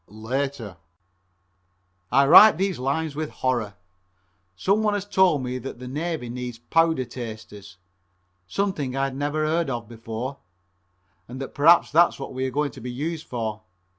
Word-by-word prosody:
(Later) 115 0 -4 1.3
I 140 +2 +5
write 185 +6 +9
these 190 -3 -1
lines 140 +3 -2
with 155 0 -3
horror. 120 -6 -2 0.8
Some 195 - +1
one 210 -1 +1
has 200 -1 -3
told 190 -8 +3
me 125 0 -3
that 130 0 -7
the 125 +1 -9
Navy 150 0 -3
needs 125 0 -6
Powder 160 +1 +1
tasters, 110 -5 -9 0.7
something 150 - -2
I'd 135 -1 -1
never 145 +2 -1
heard 160 0 0
of 120 -3 -4
before, 115 +4 -6 0.9
and 125 +2 -8
that 135 - -6
perhaps 165 +4 +5
that's 170 +3 +4
what 135 - -7
we 130 +1 -2
are - - -2
going 145 +2 -1
to 130 - -12
be 125 - -6
used 155 +5 -4
for. 110 -3 -4
135 Hz, 155 wpm, -24 LUFS, 120-160 Hz, 1.3 s, write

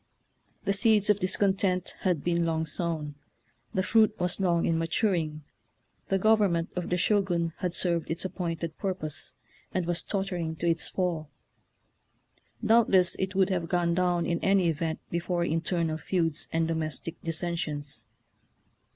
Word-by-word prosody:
The 195 - +2
seeds 210 0 +5
of 205 - 0
discontent 190 -1 +1
had 180 -6 0
been 170 -1 +1
long 160 -1 0
sown, 155 -2 -1 0.6
the 190 - 0
fruit 215 +2 +3
was 180 +1 0
long 175 -3 +2
in 165 -1 +1
matur 180 +5 +1
ing. 155 -2 -3 0.7
The 195 - +3
government 195 -5 +3
of 180 -2 -3
the 180 - +1
Shogun 180 -4 +1
had 180 -1 -2
served 170 -2 +1
its 165 +3 -2
appointed 165 -3 -4
pu'rpose, 180 -6 -3 0.4
and 185 -2 -1
was 175 0 +1
tottering 180 -5 -2
to 165 - -4
its 165 -1 +2
fall. 170 -5 -2 1.4
Doubtless 215 -5 +4
it 190 0 -2
would 195 0 +3
have 170 -3 -1
gone 175 -1 +1
down 175 -1 +1
in 170 -1 0
any 195 -3 +3
event 160 0 -2
before 170 0 -1
internal 165 -1 -1
feuds 165 -3 -1
and 165 0 +1
domestic 160 0 -3
dis 165 -1 -2
sensions. 155 -5 -4
175 Hz, 150 wpm, -28 LUFS, 165-190 Hz, 1.4 s, seeds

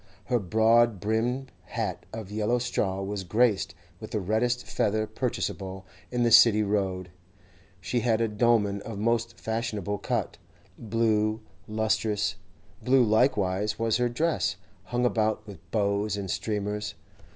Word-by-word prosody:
Her 125 +1 +1
broad 110 +2 +3
brimmed 120 +6 -1
hat - - -4
of 110 -3 -7
yellow 110 +3 +1
straw 100 -6 -1
was 100 0 -3
graced 105 +2 +1 0.2
with 110 - -8
the 110 - -1
reddest 115 +5 0
feather 110 +1 0
purchasable 100 -4 -3 0.2
in 125 -1 0
the 120 - +2
City 110 -2 +7
Road; 95 -3 -1 0.7
she 120 +6 -1
had 115 -1 +1
a 115 - +2
dolman 105 -2 +2
of 110 -1 -7
most 115 +2 0
fashionable 110 -3 -2
cut, - - -2 0.4
blue, 110 -1 0 0.3
lustrous; 110 -1 0 0.5
blue 130 0 +4
likewise 105 -3 +2
was 115 -1 +1
her 125 0 +1
dress, 155 +7 0 0.3
hung 120 0 0
about 110 -2 +1
with 100 -3 -10
bows 100 -1 0
and 95 -2 -3
streamers. 105 -1 -2
110 Hz, 135 wpm, -27 LUFS, 100-115 Hz, 0.7 s, City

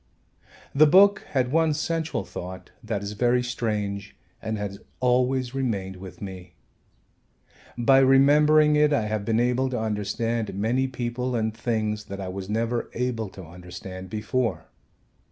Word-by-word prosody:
The 150 +2 +6
book 195 +5 +5
had 130 -2 0
one 160 0 +2
central 160 +1 -2
thought 90 +1 -8
that 110 -2 -3
is 100 - -4
very 120 +3 +2
strange 105 -4 -3 0.3
and 110 0 -3
has 100 -1 -5 0.2
always 125 0 +1
remained 100 -8 -2
with 90 0 -10
me. 90 -3 -9 1.2
By 135 +3 +5
remembering 150 +3 +5
it 150 0 +4
I 140 - +2
have 105 -1 -2
been 110 +1 +1
able 125 +2 +1
to 125 - -2
understand 110 0 -2
many 120 +6 +1
people 125 0 -3
and 110 -1 -1
things 110 -2 -2
that 100 -1 -7
I 95 -1 -4
was 95 +1 -6
never 115 +2 -1
able 115 -3 -2
to 95 -1 -11
understand 90 +2 -9
before. 110 +2 -2
115 Hz, 145 wpm, -25 LUFS, 100-130 Hz, 1.2 s, The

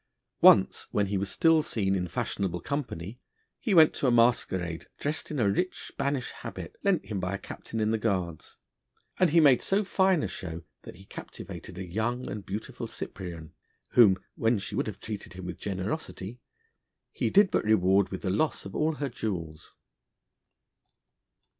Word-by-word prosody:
Once, - - +6
when 105 - +1
he 100 0 -1
was 100 0 -2
still 165 +5 +4
seen 100 -9 0
in 90 -1 -1
fashionable 90 +1 -2
company, 120 - -4 0.4
he 215 -7 +1
went 160 -2 +7
to 140 - 0
a - - +4
masquerade, 95 -8 +2
dressed 150 +2 -2
in 150 - -3
a 115 -6 +3
rich 180 - -1
Spanish 140 -2 -2
habit, - - -8
lent 195 - +2
him 100 -1 -3
by 90 +1 -2
a - - -2
Captain 110 +3 -7
in 110 0 +1
the 110 - +1
Guards, 90 -7 -2 0.6
and 185 -2 +5
he 165 +3 +5
made 140 -6 +6
so 200 +2 +1
fine 190 -3 +2
a - - 0
show 85 -3 -6 0.2
that - - -11
he 95 - -15
captivated 90 - -9
a 95 - -4
young 110 +7 -2
and 105 -1 -5
beautiful 105 +3 -5
Cyprian, 85 -4 -7 0.4
whom, 105 -6 +7 0.2
when 115 0 +2
she 100 0 -6
would - - -1
have 100 -2 -6
treated 105 -4 -7
him 90 0 -8
with 90 - -6
generosity, 100 +2 -4 0.7
he - - -1
did 200 -1 +5
but - - +1
reward 100 -2 +3
with 95 - -6
the 95 - 0
loss 145 +11 0
of - - -8
all 155 +1 +1
her 145 -2 -3
jewels. 85 -10 -5
105 Hz, 175 wpm, -28 LUFS, 95-140 Hz, 0.7 s, went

